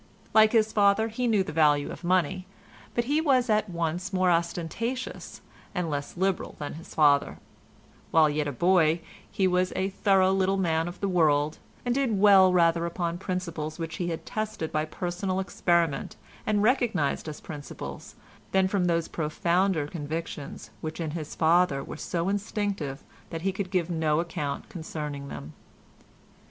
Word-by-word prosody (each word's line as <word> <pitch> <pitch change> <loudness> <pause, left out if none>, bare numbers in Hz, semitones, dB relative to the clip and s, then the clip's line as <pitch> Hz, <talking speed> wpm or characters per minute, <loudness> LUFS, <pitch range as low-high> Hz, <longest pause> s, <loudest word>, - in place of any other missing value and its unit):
Like 220 0 +6
his 220 -1 +3
father, 205 +2 +3
he 245 +3 -1
knew 210 -4 +3
the - - -7
value 150 -2 +3
of - - -9
money, 185 +1 +1 0.5
but 240 - +2
he 290 +6 +1
was 260 -6 +3
at 215 -1 +2
once 170 +2 -2
more 185 -1 +3
ostentatious 175 +9 -3 0.3
and 175 -3 -1
less 145 +3 -4
liberal 190 +1 -1
than 145 - -5
his 165 +2 -11
father; 145 -2 +4 0.7
while 160 -1 +5
yet 150 0 -1
a - - -1
boy 170 +2 +3 0.3
he 195 - 0
was 185 0 +2
a 190 +1 -1
thorough 190 -1 +3
little 195 0 +2
man 165 -3 +1
of 175 - -7
the 200 - +1
world, 155 -4 +2 0.3
and 245 - +1
did 255 -5 +1
well 195 -2 +7
rather 170 -1 +3
upon 170 0 -3
principles 170 -5 -4
which 165 -2 -5
he 175 - -2
had 165 -2 -4
tested 215 -7 -3
by 155 0 0
personal 185 +3 -3
experiment, 170 -5 0 0.3
and 210 -1 +2
recognised 215 - +1
as 150 - -7
principles, 145 -2 -8 0.4
than 190 -1 +4
from 190 -1 0
those 170 -2 +1
profounder 170 +1 0
convictions 150 -1 -6
which 155 +1 -5
in 160 -3 -2
his 155 -2 -6
father 160 -4 +3
were - - -7
so 170 +2 -2
instinctive 200 -8 -2 0.3
that 165 0 -5
he 195 - +1
could 190 0 -4
give 180 -2 0
no 160 -2 +1
account 150 -4 -3
concerning 150 -4 -6
them. 75 - -8
175 Hz, 165 wpm, -27 LUFS, 155-195 Hz, 0.7 s, well